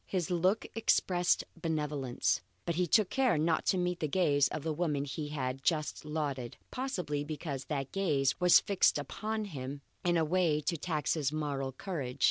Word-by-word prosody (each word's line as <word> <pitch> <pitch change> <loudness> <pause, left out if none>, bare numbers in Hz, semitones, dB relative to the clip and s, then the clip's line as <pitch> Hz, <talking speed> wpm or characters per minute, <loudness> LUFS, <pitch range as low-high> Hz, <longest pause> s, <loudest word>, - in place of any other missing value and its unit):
His 180 -2 -1
look 185 +5 +2
expressed 180 -5 +2
benevolence, 150 -6 -1 0.2
but 170 - 0
he 180 +2 +1
took 210 +3 +3
care 255 -4 +3
not 160 +1 +1
to 190 - +3
meet 180 0 0
the 155 - 0
gaze 145 -4 +3
of 155 - -5
the 160 - -1
woman 150 -3 0
he 150 +2 -4
had 135 -3 -3
just 155 +1 0
lauded, 145 -6 -3
possibly 180 - -2
because 145 -3 -5
that 135 -2 -3
gaze 150 -9 +1
was 180 -1 +8
fixed 200 -6 +3
upon 215 +9 -3
him 140 -5 -6 0.2
in 175 -1 +2
a 160 - +2
way 165 -2 +2
to 160 +3 -1
tax 155 -3 -1
his 150 -4 0
moral 140 -3 -2
courage. 140 -5 -5
155 Hz, 175 wpm, -32 LUFS, 145-180 Hz, 0.2 s, was